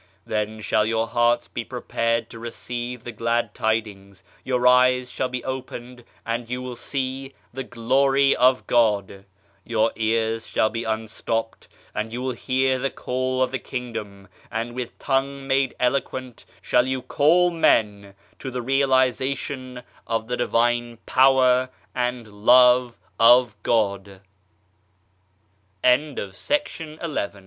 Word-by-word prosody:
Then 110 0 -3
shall 105 0 +1
your 115 0 +1
hearts 120 0 +2
be 120 - -5
prepared 115 -2 -2
to 115 - -9
receive 120 +1 -6
the 120 - -6
glad 115 0 -1
tidings, 100 -4 -3 0.2
your 125 -1 -1
eyes 125 0 +4
shall 130 - -2
be 125 -1 -4
opened 125 -2 -7 0.2
and 115 0 -3
you 125 +1 -3
will 125 -1 -6
see 135 +2 -4 0.2
the 135 +1 -4
Glory 135 +4 +2
of 130 +1 +3
God; 100 -4 +1 0.4
your 115 -1 +1
ears 110 0 0
shall 110 - +1
be 115 0 -4
un 110 0 -2
stopped 115 +1 -4 0.3
and 110 +1 -3
you 120 - -4
will 130 +1 -2
hear 130 +2 0
the 135 +2 -1
call 130 0 -1
of 130 - -2
the 130 - -2
Kingdom, 105 -6 -7 0.2
and 115 +2 -3
with 125 -1 -6
tongue 135 0 -1
made 135 -1 +1
eloquent 130 -1 -2 0.2
shall 125 +1 +2
you 130 -1 -2
call 175 +4 +3
men 105 -11 +1 0.2
to 130 - -5
the 125 -1 -4
realization 130 -1 0 0.2
of 115 -1 -1
the 125 +2 -2
Divine 120 0 0
Power 130 -1 +4 0.2
and 125 -2 -2 0.2
Love 125 0 +6 0.2
of 120 -1 +6
God! 100 -4 -1
120 Hz, 130 wpm, -23 LUFS, 115-130 Hz, 0.4 s, Love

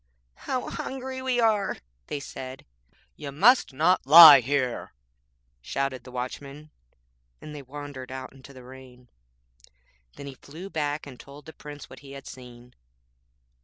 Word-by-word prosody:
'How 255 - -5
hungry 260 0 -6
we 260 -2 -1
are' 215 -4 +1 0.3
they 145 - -4
said. 130 -1 -9 0.5
'You 145 -2 -8
must 215 - +4
not 160 +2 +1
lie 155 -2 +11
here,' 130 -1 -2 0.7
shouted 130 - -4
the 125 - -11
Watchman, 140 +4 -7 0.7
and 150 - -10
they 145 - -8
wandered 140 -1 -9
out 130 0 -8
into 135 +1 -15
the 130 -2 -14
rain. 125 -1 -15 1.1
Then 140 - -10
he 140 - -8
flew 165 +9 -12
back 150 -1 -3
and 130 -3 -12
told 140 +1 -14
the 160 - -11
Prince 145 -1 -11
what - - -13
he 140 -1 -13
had 140 - -11
seen. 125 -1 -13
140 Hz, 145 wpm, -26 LUFS, 130-155 Hz, 1.1 s, lie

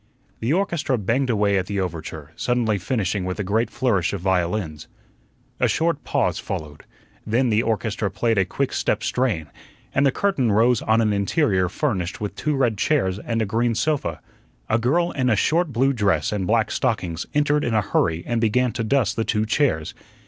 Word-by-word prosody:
The 115 +4 -1
orchestra 170 -7 0
banged 120 +6 0
away 100 -3 +2
at 90 - -4
the 100 -1 -2
overture, 80 -4 -5
suddenly 115 -4 0
finishing 100 -1 -1
with 90 +1 -4
a - - 0
great 110 +5 0
flourish 100 -10 0
of 100 - -4
violins. 90 -3 -1 0.7
A - - +3
short 165 -2 0
pause - - 0
followed. 75 -1 -6 0.4
Then 120 +3 +1
the 110 0 +3
orchestra 110 -1 -1
played 115 +2 0
a - - +4
quick 135 +8 -2
step - - 0
strain, 115 -11 0 0.5
and 140 - +2
the 135 - +4
curtain 135 - +1
rose 115 +3 +3
on 110 +1 +2
an 105 -2 +2
interior 100 - +1
furnished 100 - -2
with 105 -1 -4
two 150 -1 -1
red 120 -7 +1
chairs 100 -11 +1
and 115 0 -1
a - - -1
green 115 +3 0
sofa. 155 +3 -1 0.5
A 110 - +2
girl 165 +9 +1
in 130 -2 0
a 110 - +4
short 165 - +1
blue 135 +3 +2
dress 100 - +1
and 100 -3 -2
black 110 -1 +2
stockings 90 -10 -1
entered 150 0 +2
in 115 - 0
a 110 - +4
hurry 85 -4 0
and 120 -1 -1
began 120 +2 +2
to 115 +1 -3
dust 130 +1 +1
the 115 - 0
two 110 -1 0
chairs. 110 - 0
110 Hz, 190 wpm, -23 LUFS, 95-130 Hz, 0.7 s, a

